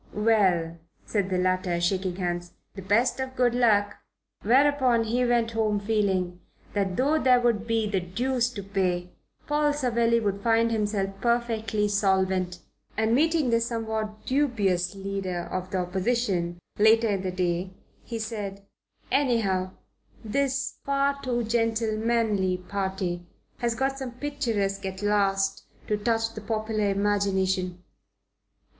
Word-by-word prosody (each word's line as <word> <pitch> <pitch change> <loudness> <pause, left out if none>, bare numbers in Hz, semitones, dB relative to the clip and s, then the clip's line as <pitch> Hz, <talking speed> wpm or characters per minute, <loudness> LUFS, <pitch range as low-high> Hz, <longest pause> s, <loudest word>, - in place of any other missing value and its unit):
"Well," 190 -7 +2 0.3
said 200 -3 -1
the 185 - 0
latter, 185 -1 +1
shaking 185 +1 0
hands, 175 -1 -3 0.2
"the 195 - -8
best 225 +8 +2
of 260 0 -4
good 245 -2 +2
luck!" 210 -4 +3 0.4
Whereupon 255 0 +3
he 235 +3 0
went 240 -2 +2
home 215 -2 +1
feeling 195 -4 0 0.3
that 195 -3 0
though 295 +4 +2
there 250 -1 +5
would 230 -2 +1
be 225 -2 +1
the 200 -2 0
deuce 240 +7 -1
to 200 -4 -6
pay, 180 -3 -1 0.3
Paul 295 0 +2
Savelli 235 -4 +2
would 200 -3 -2
find 230 +1 +3
himself 205 -3 0
perfectly 225 -3 0
solvent; 190 -3 +1 0.4
and 220 +1 +2
meeting 310 -1 +2
the 230 0 +3
somewhat 220 -2 -3
dubious 205 -10 +1
Leader 195 -2 -3
of 185 0 -3
the 190 - -2
Opposition 185 -1 -1 0.2
later 220 +2 +5
in 195 -2 0
the 185 - -2
day 180 0 -1 0.3
he 230 - -5
said: 205 -3 -5 0.5
"Anyhow, 220 -9 +1 0.6
this 275 +4 -1
'far 280 0 0
too 240 -2 -1
gentlemanly 225 -3 +1
party' 190 -2 -3 0.3
has 235 -1 0
got 270 +2 -1
someone 250 -2 -6
picturesque, 230 -9 -2
at 190 +1 -5
last, 195 -1 +1 0.2
to 210 - 0
touch 225 +1 0
the 215 - -7
popular 215 -1 -1
imagination." 190 -2 0
210 Hz, 135 wpm, -26 LUFS, 190-235 Hz, 0.6 s, there